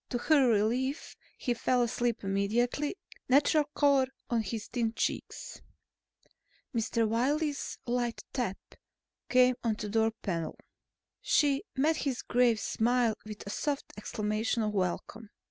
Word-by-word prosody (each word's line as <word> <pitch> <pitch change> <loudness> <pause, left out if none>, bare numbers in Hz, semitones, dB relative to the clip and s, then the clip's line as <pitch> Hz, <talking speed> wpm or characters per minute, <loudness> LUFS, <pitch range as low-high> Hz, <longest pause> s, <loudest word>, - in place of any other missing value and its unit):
To 245 - -1
her 280 +1 +4
relief, 240 +7 0 0.2
he 245 - 0
fell 245 +1 +2
asleep 240 -1 -1
immediately, 230 - 0 0.3
natural 290 +3 +4
color 280 -3 +4 0.2
on 235 -1 +2
his 220 +1 -4
thin 230 -2 -1
cheeks. - - -3 1.1
Mr. 230 0 +1
Wiley's 285 +6 0
light 240 -1 -1
tap 235 -7 -1 0.7
came 255 0 +5
on 225 -2 +1
the 210 0 -5
door 225 +1 +3
panel. 170 -5 -2 0.6
She 285 -2 +3
met 305 +4 +2
his 270 -5 -2
grave 240 -2 +3
smile 235 0 +2
with 210 -1 -8
a 200 - -5
soft 285 +3 -2
exclamation 215 +2 -1
of 210 - 0
welcome. 200 +3 -2
240 Hz, 130 wpm, -30 LUFS, 220-265 Hz, 1.1 s, came